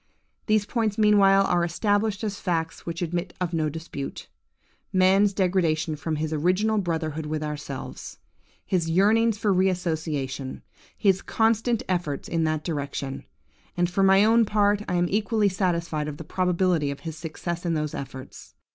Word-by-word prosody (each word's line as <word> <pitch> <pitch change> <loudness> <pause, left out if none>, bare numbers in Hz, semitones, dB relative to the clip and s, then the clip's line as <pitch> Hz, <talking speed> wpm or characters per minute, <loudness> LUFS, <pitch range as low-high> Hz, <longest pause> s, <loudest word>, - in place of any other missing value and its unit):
These 215 -2 +3
points 220 -3 -1
meanwhile 200 -2 +5
are 175 -2 +2
established 205 +4 0
as 205 -2 -3
facts 165 -3 -2
which 170 +1 -3
admit 175 +1 -3
of 180 -2 -2
no 155 -2 +1
dispute:–man's 185 +5 -1
degradation 175 -5 +1
from 155 +1 -3
his 155 +1 -2
original 185 +8 +1
brotherhood 160 -4 -2
with 155 0 -2
ourselves; 150 -3 -6 0.5
his 170 -3 0
yearnings 215 +5 +3
for 205 -1 +1
re 190 +1 +3
association; 155 -7 -3 0.3
his 195 -2 +2
constant 225 +1 +1
efforts 175 -6 -2
in 165 -1 0
that 155 -1 -1
direction. 140 -4 -4 0.5
And 175 0 +2
for 180 +3 -1
my 195 +1 +6
own 230 +1 +5
part, 205 -1 +2
I 180 - 0
am 175 0 +2
equally 210 +2 +1
satisfied 170 -5 -1
of 145 -1 -5
the 160 - -7
probability 180 -3 +1
of 140 - -6
his 160 -2 -6
success 170 +2 -5
in 170 -2 0
those 150 -1 -2
efforts. 130 -1 -9
175 Hz, 155 wpm, -25 LUFS, 155-200 Hz, 0.5 s, my